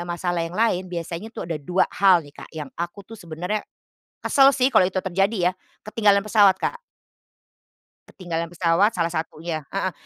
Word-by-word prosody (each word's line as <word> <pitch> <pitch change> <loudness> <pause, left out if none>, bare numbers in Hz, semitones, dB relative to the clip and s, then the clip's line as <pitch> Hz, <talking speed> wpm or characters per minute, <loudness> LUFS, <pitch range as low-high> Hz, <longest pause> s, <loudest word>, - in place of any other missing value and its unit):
masalah 175 0 -2
yang 165 +3 -4
lain, 185 -5 +1
biasanya 170 +3 -5
tuh 225 - -7
ada 165 -3 -4
2 180 +6 +1
hal 185 -5 +4
nih 145 - -15
Kak - - -10
yang 150 -3 -5
aku 175 +3 -6
tuh 225 - -11
sebenarnya 175 +5 -4 0.6
kesel 275 0 +5
sih 260 0 +2
kalau 215 -7 +5
itu 185 0 -2
terjadi 190 0 +1
ya, - - -10 0.3
ketinggalan 210 -2 +2
pesawat 205 -2 +5
Kak. 485 - -1 1.3
Ketinggalan 170 -2 -5
pesawat 175 +5 +2
salah 170 -2 0
satunya. 160 -1 -4
Heeh. 190 -2 -1
180 Hz, 165 wpm, -23 LUFS, 170-205 Hz, 1.3 s, kesel